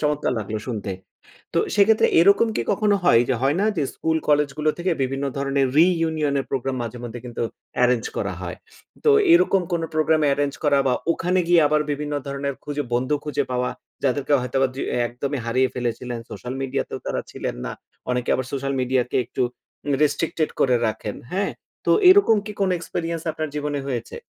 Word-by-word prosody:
চমৎকার 150 Hz, -3 st, 0 dB
লাগলো 110 Hz, 0 st, -3 dB
শুনতে। 110 Hz, -5 st, -3 dB, 0.6 s
তো -, -, +3 dB, 0.2 s
সেক্ষেত্রে 210 Hz, +2 st, +5 dB
এরকম 200 Hz, +6 st, +5 dB
কি -, -, 0 dB
কখনো 205 Hz, 0 st, +2 dB
হয় 115 Hz, -8 st, +6 dB
যে 130 Hz, -, +2 dB
হয় 140 Hz, +4 st, +2 dB
না 205 Hz, -, +2 dB
যে -, -, +2 dB
স্কুল, 160 Hz, 0 st, 0 dB
কলেজগুলো 150 Hz, +1 st, +2 dB
থেকে 180 Hz, +2 st, 0 dB
বিভিন্ন 135 Hz, +1 st, -2 dB
ধরনের 140 Hz, 0 st, +1 dB
রিইউনিয়ন 160 Hz, -4 st, +2 dB
এর -, -, -6 dB
প্রোগ্রাম 135 Hz, 0 st, -1 dB
মাঝে 120 Hz, +1 st, -6 dB
মধ্যে 120 Hz, +1 st, -6 dB
কিন্তু 120 Hz, -1 st, -4 dB, 0.4 s
এরেঞ্জ 125 Hz, -2 st, +2 dB
করা -, -, -2 dB
হয়। -, -, -5 dB, 0.5 s
তো 445 Hz, -, +6 dB, 0.2 s
এইরকম 340 Hz, -, +5 dB
কোনো 165 Hz, -1 st, 0 dB
প্রোগ্রাম 155 Hz, 0 st, +2 dB
এরেঞ্জ 140 Hz, 0 st, 0 dB
করা 145 Hz, -1 st, +4 dB
বা 125 Hz, -, +3 dB, 0.2 s
ওখানে 180 Hz, +2 st, 0 dB
গিয়ে 175 Hz, -1 st, +6 dB
আবার 150 Hz, 0 st, +2 dB
বিভিন্ন 145 Hz, +1 st, -3 dB
ধরনের 140 Hz, 0 st, -3 dB
খুঁজে, 145 Hz, 0 st, -2 dB
বন্ধু 130 Hz, +4 st, +1 dB
খুঁজে 145 Hz, -1 st, -1 dB
পাওয়া 125 Hz, 0 st, 0 dB, 0.3 s
যাদেরকে 140 Hz, +2 st, 0 dB
হয়তোবা 135 Hz, +2 st, +1 dB
দ্রি 135 Hz, -, -4 dB, 0.2 s
একদমই 135 Hz, +3 st, -4 dB
হারিয়ে 130 Hz, +3 st, +2 dB
ফেলেছিলেন, 120 Hz, 0 st, -3 dB
সোশ্যাল 125 Hz, +1 st, -6 dB
মিডিয়াতেও 135 Hz, 0 st, -3 dB
তারা -, -, -1 dB
ছিলেন -, -, -4 dB
না। -, -, -4 dB, 0.4 s
অনেকে 125 Hz, -1 st, -1 dB
আবার 130 Hz, -, -2 dB
সোশ্যাল 140 Hz, 0 st, -2 dB
মিডিয়াকে 125 Hz, -1 st, 0 dB
একটু 130 Hz, +1 st, -2 dB, 0.5 s
উ -, -, +3 dB
রেস্ট্রিকটেড 155 Hz, +1 st, 0 dB
করে 125 Hz, -2 st, +4 dB
রাখেন, 105 Hz, -1 st, -3 dB, 0.2 s
হ্যাঁ? 195 Hz, +2 st, 0 dB, 0.3 s
তো -, -, +3 dB, 0.2 s
এইরকম 370 Hz, -, +7 dB
কি 210 Hz, -, -5 dB
কোনো 190 Hz, -2 st, +2 dB
এক্সপেরিয়েন্স 165 Hz, -1 st, -4 dB
আপনার 155 Hz, 0 st, -3 dB
জীবনে 145 Hz, -1 st, -2 dB
হয়েছে? 120 Hz, -4 st, -4 dB
140 Hz, 180 wpm, -23 LUFS, 125-160 Hz, 0.6 s, এইরকম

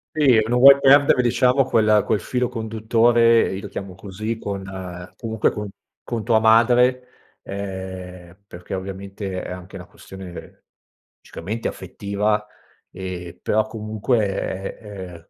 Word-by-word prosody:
Sì, 135 Hz, -7 st, +5 dB
non 120 Hz, +1 st, +1 dB
vuoi 140 Hz, +1 st, +9 dB
perdere, 140 Hz, -1 st, +5 dB
diciamo, 125 Hz, +2 st, +3 dB
quel 110 Hz, -2 st, +3 dB
quel 105 Hz, -, +1 dB
filo 125 Hz, -1 st, -1 dB
conduttore, 115 Hz, 0 st, +2 dB
io 95 Hz, -, -5 dB
lo 105 Hz, -, -7 dB
chiamo 95 Hz, -2 st, -7 dB
così, 110 Hz, +4 st, -5 dB
con 100 Hz, -1 st, -5 dB, 0.5 s
comunque, 110 Hz, -2 st, -1 dB
con 105 Hz, -1 st, -6 dB, 0.3 s
con 115 Hz, -3 st, -4 dB
tua 115 Hz, -2 st, +3 dB
madre, 125 Hz, +3 st, +4 dB, 0.4 s
ehm, 95 Hz, -2 st, -7 dB
perché, 90 Hz, 0 st, -9 dB
ovviamente, 95 Hz, 0 st, -5 dB
è -, -, -7 dB
anche 90 Hz, 0 st, -9 dB
una -, -, -8 dB
questione 95 Hz, -2 st, -12 dB, 0.6 s
logicamente 110 Hz, +7 st, -5 dB
affettiva, 105 Hz, +1 st, -2 dB, 0.4 s
ehm, 90 Hz, -2 st, -7 dB
però, 110 Hz, 0 st, +1 dB
comunque, 110 Hz, +1 st, -1 dB
è 95 Hz, 0 st, -4 dB
è 95 Hz, -6 st, -10 dB
105 Hz, 130 wpm, -22 LUFS, 95-115 Hz, 0.6 s, vuoi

